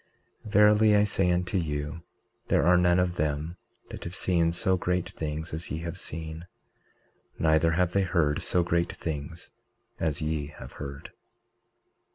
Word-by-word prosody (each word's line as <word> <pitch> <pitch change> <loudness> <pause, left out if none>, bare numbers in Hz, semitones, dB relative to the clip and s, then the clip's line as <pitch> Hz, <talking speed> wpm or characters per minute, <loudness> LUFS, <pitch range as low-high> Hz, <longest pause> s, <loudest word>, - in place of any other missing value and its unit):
19:36 - - -8
Verily 105 0 +6
I 105 - +5
say 95 -3 +1
unto 90 +2 0
you, 75 0 -3 0.5
there 70 - +2
are 90 +1 +6
none 90 0 +4
of 90 -1 0
them 75 +3 -2 0.3
that - - -8
have 85 +2 -7
seen 85 -3 +1
so 95 +2 +1
great 90 0 -1
things 80 +1 -5
as 80 +2 -5
ye 80 - -4
have 85 -1 -5
seen; 80 +1 -6 0.9
neither 80 +1 +3
have 90 +1 +1
they 100 - +2
heard 85 -6 +1
so 90 - +2
great 85 0 0
things 80 +1 -6 0.5
as 80 -3 -1
ye 75 -2 -2
have 75 - -11
heard. 70 -1 -7
85 Hz, 160 wpm, -27 LUFS, 80-90 Hz, 0.9 s, Verily